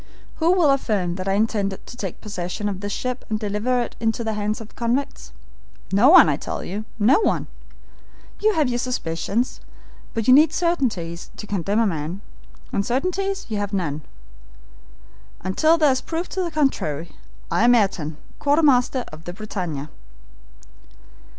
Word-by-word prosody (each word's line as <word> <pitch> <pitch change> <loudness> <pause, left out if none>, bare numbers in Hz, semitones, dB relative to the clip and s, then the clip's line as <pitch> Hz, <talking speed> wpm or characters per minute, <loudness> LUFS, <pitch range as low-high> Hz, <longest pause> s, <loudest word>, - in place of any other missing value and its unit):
Who 330 +1 +3
will 340 -6 +4
affirm 210 -10 0
that 185 +1 -5
I 195 - +2
intended 200 -2 0
to - - -10
take 195 -8 -6
possession 200 0 -4
of 195 -2 -3
this 205 +1 -4
ship 250 +4 -3
and 215 -1 -1
deliver 215 +4 0
it - - -8
into 225 +1 0
the 220 -1 -1
hands 210 0 -2
of 225 -1 -9
the - - -24
convicts? 245 +4 -2 0.6
No 205 +8 +6
one, 365 - +9
I - - +1
tell - - -5
you, 210 +4 -5
no 235 - +5
one. - - +1 0.9
You 430 +1 +3
have 305 -6 +2
your 245 -1 -1
suspicions, 235 -1 -2 0.6
but 225 -1 -1
you 255 - +8
need 305 +3 +6
certainties 230 - -1
to - - -7
condemn 200 0 -1
a 230 - +4
man, 170 0 -3 0.5
and 200 - +1
certainties 370 - -1
you 220 -2 -3
have 205 0 -3
none. 155 -6 -1 1.4
Until 310 - +3
there 305 -4 +4
is 260 - +1
a - - -14
proof 335 +2 -3
to 380 - -2
the 350 - -1
contrary, 175 - -1 0.4
I - - +2
am 245 +1 +6
Ayrton, 165 -8 0 0.2
quartermaster 275 -4 +3
of 155 +1 -11
the 175 - -5
BRITANNIA." 180 -8 -5
220 Hz, 170 wpm, -23 LUFS, 195-270 Hz, 1.4 s, one